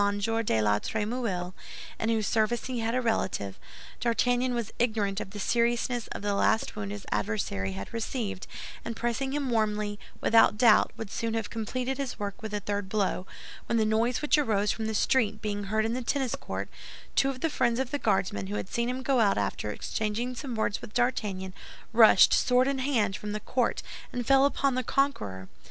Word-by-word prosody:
de 205 - +1
la 105 0 +3
Trémouille, 210 - -2 0.5
in 225 - 0
whose 220 -2 +1
service 225 +2 +1
he 255 -2 -3
had 230 +1 -1
a 255 - +2
relative, 185 - -1 0.4
D'Artagnan 245 +1 +1
was 235 -3 -3
ignorant 215 -4 +1
of - - -6
the 205 - -9
seriousness 235 +2 +1
of - - -7
the 205 0 0
last 220 +2 +1
wound 200 -2 -4
his 205 -1 -7
adversary 100 -2 -1
had 100 +1 -7
received, 225 -4 -3 0.4
and 230 - -4
pressing 240 +4 -1
him 280 -3 -1
warmly, 210 -2 0 0.2
without 225 -2 +5
doubt 225 -1 +5
would 220 -3 -6
soon 225 -1 -2
have 225 -2 -3
completed 250 +4 -3
his 275 -2 -3
work 200 -1 -5
with 220 -1 -5
a 210 - -1
third 205 -1 -3
blow, 190 -2 0 0.4
when 230 - +1
the 220 - +3
noise 230 +5 +1
which 300 0 +4
arose 210 -7 +2
from 220 -1 -3
the 220 - -2
street 220 -2 +2
being 205 -1 -3
heard 215 +2 +1
in 225 - 0
the 255 - -2
tennis 260 0 -1
court, - - -4 0.5
two 270 - +4
of 260 -1 -5
the - - +2
friends 240 -5 +1
of 265 -1 -2
the 290 - -1
Guardsman, 185 - 0
who 100 - -4
had 105 -2 -4
seen 235 +1 -1
him 255 +1 -3
go 265 -2 +2
out 210 -3 +3
after 100 +1 -2
exchanging 220 - -2
some 250 -1 -5
words 220 -2 -1
with 210 - -10
D'Artagnan, 210 -7 0 0.4
rushed, 220 -4 +7
sword 250 +1 +4
in 275 -1 0
hand, 235 -8 +1
from 210 +1 -5
the 210 - -2
court, 245 +3 -1 0.3
and 245 -1 -3
fell 270 +1 +5
upon 280 -1 +1
the 255 - 0
conqueror. 105 - -1
225 Hz, 200 wpm, -28 LUFS, 205-245 Hz, 0.5 s, rushed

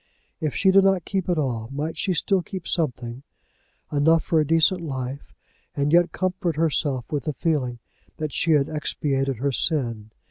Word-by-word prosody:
If 155 -3 -2
she 190 - +4
did 195 0 +6
not 195 -3 +2
keep 190 -3 -2
it 175 - +1
all 120 -6 -2
might 150 +4 -3
she 185 - -1
still 190 +3 +1
keep 185 0 -7
something, 125 -6 -2 0.7
enough 160 +3 +3
for 160 -2 +2
decent 165 +4 +3
life, 135 -3 -5 0.4
and 145 +2 0
yet 175 0 +5
comfort 185 -3 -1
herself 145 -5 0
with 145 -4 -2
the 150 - -1
feeling 135 -6 -1 0.4
that 155 -2 -4
she 165 - +2
had 145 -2 +3
expiated 135 -3 -1
her 140 +4 0
sin? 120 -7 -1
155 Hz, 170 wpm, -24 LUFS, 135-170 Hz, 0.7 s, did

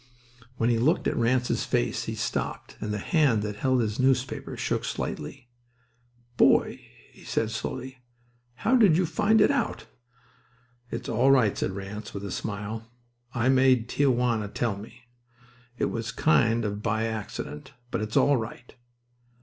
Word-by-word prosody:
When 115 +1 +2
he 115 - +2
looked 150 +8 +2
at - - 0
Ranse's 125 +1 +1
face - - -1
he - - -4
stopped, - - -3
and 105 0 -3
the 105 - -1
hand 130 - +2
that 105 -1 -4
held 130 +2 +2
his 105 0 -2
newspaper 130 0 0
shook - - -1
slightly. 125 -3 -5 0.9
"Boy," - - +4 0.3
he - - -17
said 115 0 -1
slowly, 130 +3 -5 0.6
"how 230 - +2
did 200 -9 +5
you 180 - +2
find 215 +5 +3
it 210 - +5
out?" 280 - -1 1.0
"It's 115 - -5
all 120 +4 +2
right," 125 -7 +4
said 95 - -2
Ranse, 100 +2 -7
with 100 0 -5
a 100 - -5
smile. 105 +3 -5 0.5
"I 120 +1 +2
made 130 -3 +4
Tia 140 +2 +2
Juana 120 -4 +1
tell 110 +1 -1
me. 115 +5 -12 0.7
It - - 0
was 115 -1 -3
kind 115 -7 +2
of 105 0 -3
by 110 0 0
accident, 105 -9 -6 0.2
but - - -1
it's 110 +1 -2
all 145 -1 +4
right." 115 +2 -7
115 Hz, 160 wpm, -27 LUFS, 105-130 Hz, 1.0 s, did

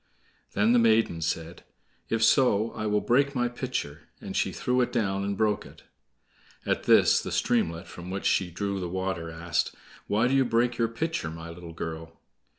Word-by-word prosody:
Then 105 +4 +3
the 120 - +5
maiden 110 -7 +3
said: 80 +1 -3 0.5
"If 115 0 +1
so, 115 -3 +4
I 110 - -4
will 105 0 +1
break 140 +3 +2
my 120 -1 +1
pitcher"; 120 - -5
and - - -7
she - - +1
threw 125 0 0
it 120 - 0
down 100 -5 0
and 100 0 -2
broke 105 -1 +1
it. - - -15 0.8
At - - -1
this - - +5
the - - -6
streamlet, 85 +2 0
from 90 +1 -9
which 95 +1 -4
she 95 - +2
drew 100 +3 -3
the 90 -2 -4
water, 95 -2 -3
asked: 85 +1 -2 0.3
"Why 110 +4 +2
do 130 - 0
you 135 -1 +4
break 120 0 +1
your 115 - +3
pitcher, 120 - -3
my 80 +1 -8
little 85 0 -10
girl?" 80 0 -7
100 Hz, 185 wpm, -27 LUFS, 85-120 Hz, 0.8 s, the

